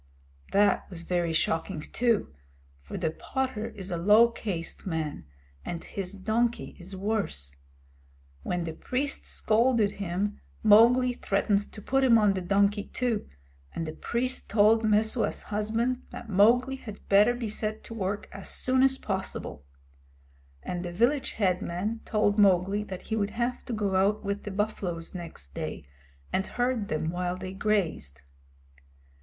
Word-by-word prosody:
That 205 +1 +3
was 170 -3 -8
very 175 -1 0
shocking, 160 +2 0
too, 230 - 0 0.5
for 70 - -7
the 165 -3 0
potter 240 +3 -3
is 190 -2 -6
a 175 - -1
low 210 +7 +6
caste 190 -6 -4
man, 160 - -3 0.4
and 170 -1 -5
his 195 0 -5
donkey 225 +4 -1
is 185 +2 -8
worse. 190 - -2 0.9
When 175 - -2
the 165 -1 -4
priest 270 - -2
scolded 225 -1 +2
him, 195 +3 -2 0.2
Mowgli 240 +4 +6
threatened 200 -2 0
to 210 - -11
put 270 0 +2
him 240 -3 +6
on 210 -2 +4
the 190 - -2
donkey 200 +2 +2
too, 240 -4 -2 0.5
and 165 - -2
the 155 - -4
priest 250 +8 -2
told 220 +2 +5
Messua's 220 +2 +1
husband 225 +4 -1
that - - -9
Mowgli 240 +7 +4
had 215 -5 -10
better 210 +5 +5
be 240 -2 -3
set 215 0 -2
to - - -9
work 205 -2 -3
as 195 -1 -7
soon 260 0 +2
as 265 0 +4
possible; 190 - -4 1.0
and 175 0 -3
the 175 - -4
village 240 +10 +1
head 185 -4 +1
man 205 +7 -3
told 210 -1 +2
Mowgli 195 +1 +4
that 185 -3 -7
he 220 - -2
would 205 -2 0
have 245 +1 -1
to 245 - -4
go 205 -3 0
out 200 +3 +2
with 200 0 -3
the - - -3
buffaloes 190 -5 -3
next 165 - -8
day, - - -5 0.5
and 190 - 0
herd 245 -4 -1
them 160 -1 -1
while 180 +1 -2
they 185 0 -6
grazed. 170 - -1
205 Hz, 155 wpm, -28 LUFS, 180-230 Hz, 1.0 s, low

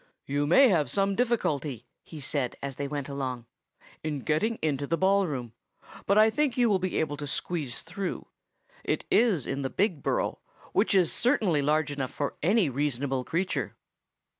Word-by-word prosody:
"You 145 +1 0
may 265 - +7
have 160 -7 +2
some 195 0 +1
difficulty," 150 - -1 0.2
he 160 - -10
said 135 -2 -1
as 140 -2 -6
they 140 - -2
went 145 -1 -4
along, 130 -4 -4 0.6
"in 150 -3 -3
getting 210 - 0
into 145 -2 -1
the 165 - 0
ball 195 +1 +3
room, 125 -6 -5 0.5
but 200 - +4
I 215 +1 +6
think 275 +1 0
you 240 -3 +4
will 195 - +3
be 185 0 -2
able 145 -2 -1
to 145 0 -5
squeeze 145 -2 -2
through. 180 +3 -4 0.6
It - - -1
is 210 - +3
in 140 - -3
the 135 - -2
Big 185 -5 0
Burrow, - - -1 0.3
which 200 -1 +2
is 180 -4 +3
certainly 215 - +2
large 150 +1 +1
enough 135 -3 -3
for 145 - -3
any 195 +3 +3
reasonable 135 -1 -1
creature. 180 +7 -2
155 Hz, 175 wpm, -28 LUFS, 140-195 Hz, 0.6 s, may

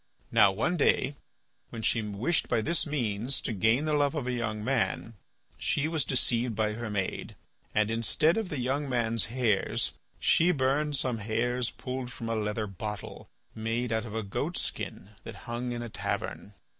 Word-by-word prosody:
Now 100 - +7
one 145 - 0
day 140 -1 +3 0.5
when 115 -1 -6
she 115 - +3
wished 105 +10 0
by 120 -2 +3
this 165 +6 0
means 120 -3 0
to 120 - -2
gain 110 +8 +3
the 155 - +1
love 145 +1 +3
of 145 -5 -1
a 125 - 0
young 115 -3 -2
man, 115 -2 0 0.5
she 150 +1 +2
was 160 -4 0
deceived 120 -3 +1
by 105 0 +1
her 115 +1 -4
maid, 95 -3 -2 0.4
and 105 0 +3
instead 115 - +3
of 220 -4 -1
the 150 - -3
young 135 +3 0
man's 115 -2 +1
hairs, 115 -4 +1 0.3
she 170 - +4
burned 145 0 +1
some 125 -4 0
hairs 115 +3 0
pulled 130 -1 -5
from 115 -1 -5
a 115 - +1
leather 105 0 -1
bottle, 105 +1 -6 0.2
made 115 +2 -1
out 110 0 0
of 110 -1 -6
a 110 - -1
goatskin 100 0 -3
that - - -7
hung 120 +1 -3
in 120 0 -3
a - - -4
tavern. 105 -1 -3
120 Hz, 175 wpm, -29 LUFS, 110-135 Hz, 0.5 s, Now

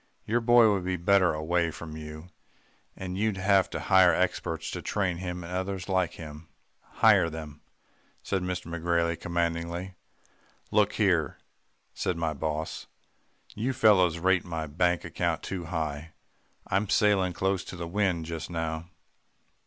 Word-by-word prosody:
'Your 120 +3 +1
boy 115 -2 +6
would 95 -2 -1
be 90 0 -1
better 95 0 +4
away 85 +2 0
from 80 0 -8
you 75 +2 -9 0.7
and 95 0 -5
you'd 110 -2 0
have 95 0 +3
to - - -4
hire 95 -2 +5
experts 80 -3 -1
to - - -5
train 95 -4 -1
him 90 0 -5
and 85 +2 -7
others 95 0 -3
like 95 -3 +1
him.' 80 0 -10 0.3
"'Hire 85 - +4
them,' 75 -2 -8 0.6
said 95 -2 -1
McGrailey 85 -2 -1
commandingly. 85 +2 -2 0.8
"'Look 105 -1 +3
here,' 90 -9 +1 0.6
said 90 -2 -2
my 80 -2 -1
boss, 80 +1 -4 0.7
'you 120 +5 -2
fellows 100 -9 +4
rate 95 +1 +2
my 80 -2 -4
bank 85 +3 0
account - - -2
too 90 -3 -4
high. 80 -1 -4 0.5
I'm 100 +1 0
sailing 100 -4 +3
close 95 +2 0
to - - -8
the 85 -1 -5
wind 90 -3 0
just 80 0 -5
now. 80 0 -3
90 Hz, 145 wpm, -28 LUFS, 80-95 Hz, 0.8 s, boy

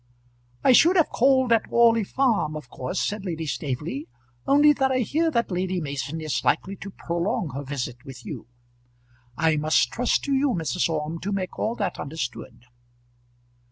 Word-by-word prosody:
"I - - +6
should 335 +8 +6
have 335 -4 +4
called 260 -1 +3
at 225 - +2
Orley 230 -1 +4
Farm, 215 - 0
of 140 -5 -9
course," 125 - -4
said 210 -1 -2
Lady 165 -4 -4
Staveley, 145 +1 -4 0.4
"only 295 +1 +6
that 270 -2 +1
I 255 -1 +1
hear 315 +8 +1
that 235 -8 -1
Lady 185 0 -1
Mason 145 +1 -4
is 155 -3 -2
likely 155 +10 0
to 200 - -8
prolong 175 - -2
her 140 +2 -4
visit 130 -3 -5
with 130 -4 -11
you. - - -7 0.9
I 160 -1 +2
must 150 -5 +2
trust 245 0 0
to 280 - -1
you, 270 -2 +2
Mrs. 170 +1 -1
Orme, 155 +1 -3
to 200 - -4
make 190 -2 -3
all 225 +2 -1
that 200 -6 -3
understood." 135 -5 -6
180 Hz, 170 wpm, -25 LUFS, 150-235 Hz, 0.9 s, I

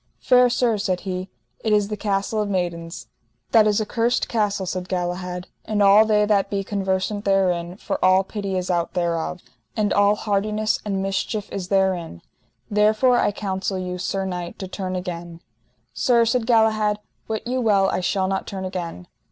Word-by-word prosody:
Fair 250 -1 +5
sir, 235 -3 +1
said 185 -3 -1
he, 185 -1 -4 0.3
it 220 - 0
is 210 -1 +3
the 210 - -2
Castle 205 +1 -1
of 210 - -2
Maidens. 170 -3 -3 0.5
That 220 -2 +6
is 210 0 +2
a 215 - -1
cursed 235 +3 0
castle, 205 -4 0
said 180 0 -4
Galahad, 180 0 -3 0.2
and 210 -1 0
all 200 +2 +7
they 210 -1 +3
that 200 -2 +2
be 200 -1 -1
conversant 195 +1 -1
therein, 180 -3 +1
for - - -4
all 185 +1 +5
pity 195 -1 -4
is 185 0 -2
out 170 -1 -1
thereof, 170 0 -1 0.4
and 210 -1 +1
all 205 +1 +4
hardiness 210 +1 0
and 195 -2 -2
mischief 195 +2 -2
is 190 -2 -4
therein. 185 - 0 0.4
Therefore, 215 +4 +3
I - - +2
counsel 195 -1 -3
you, 180 0 -4
sir 195 +2 -2
knight, 180 -2 -5
to 190 - -6
turn 185 0 -4
again. 175 -2 -6 0.5
Sir, 235 -2 +3
said 230 0 0
Galahad, 215 -3 +3 0.3
wit 220 -1 -3
you 255 +1 -1
well 200 -4 +3
I - - 0
shall 190 +1 0
not 195 0 -2
turn 190 -1 -5
again. 175 - -5
195 Hz, 175 wpm, -23 LUFS, 185-215 Hz, 0.5 s, all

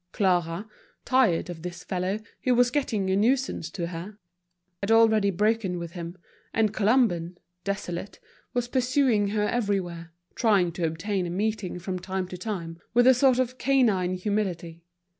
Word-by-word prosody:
Clara, 180 0 +1 0.4
tired 250 -12 +3
of 175 -2 -7
this 180 +1 -7
fellow, 185 +3 -2 0.2
who 250 -1 +3
was 245 0 +4
getting 220 -9 0
a - - +3
nuisance 245 -3 +1
to 170 - -4
her, 175 +5 -7 0.6
had 200 - -2
already 220 -2 +5
broken 205 -1 +1
with 170 -1 -6
him, 170 0 -7 0.4
and 215 -2 +2
Colomban, 200 -6 +2 0.3
desolated, 195 -1 -4 0.3
was 245 -1 -1
pursuing 250 -4 +2
her 210 +1 0
everywhere, 185 -8 -2 0.2
trying 200 -7 +3
to 170 0 -1
obtain 180 +3 -2
a - - -4
meeting 200 0 -2
from 180 +1 -4
time 185 0 -3
to 180 - -6
time, 170 -5 -5 0.2
with 245 0 +6
a 260 - +8
sort 255 0 +4
of 255 0 -1
canine 215 -10 +2
humility. 180 -4 -2
200 Hz, 155 wpm, -26 LUFS, 175-225 Hz, 0.6 s, a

